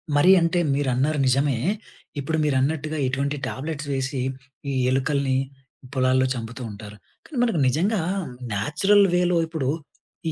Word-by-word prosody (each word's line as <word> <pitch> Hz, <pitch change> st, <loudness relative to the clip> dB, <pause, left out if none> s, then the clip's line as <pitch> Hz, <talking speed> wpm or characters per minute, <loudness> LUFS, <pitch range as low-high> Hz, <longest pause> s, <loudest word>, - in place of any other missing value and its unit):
మరి 145 Hz, +6 st, +6 dB
అంటే 165 Hz, +1 st, +2 dB
మీరన్నారు 140 Hz, +2 st, +1 dB
నిజమే. 135 Hz, 0 st, +2 dB, 0.6 s
ఇప్పుడు 160 Hz, +3 st, -1 dB
మీరన్నట్టుగా 150 Hz, +2 st, 0 dB
ఇటువంటి 140 Hz, +2 st, -1 dB
టాబ్లెట్స్ 150 Hz, +1 st, -5 dB
వేసి 135 Hz, +1 st, -2 dB, 0.5 s
ఈ -, -, -2 dB, 0.2 s
ఎలుకల్ని 135 Hz, 0 st, +1 dB, 0.6 s
పొలాల్లో 130 Hz, 0 st, +3 dB
చంపుతూ 115 Hz, +1 st, -6 dB
ఉంటారు. 105 Hz, 0 st, -10 dB, 0.3 s
కానీ 295 Hz, -, -8 dB
మనకు 225 Hz, -9 st, +1 dB
నిజంగా 185 Hz, -, +1 dB, 0.5 s
న్యాచురల్ 160 Hz, -, +3 dB
వే‌లో 180 Hz, -1 st, +3 dB
ఇప్పుడు 160 Hz, -5 st, -2 dB, 0.6 s
ఈ -, -, -1 dB
140 Hz, 120 wpm, -24 LUFS, 130-160 Hz, 0.6 s, మరి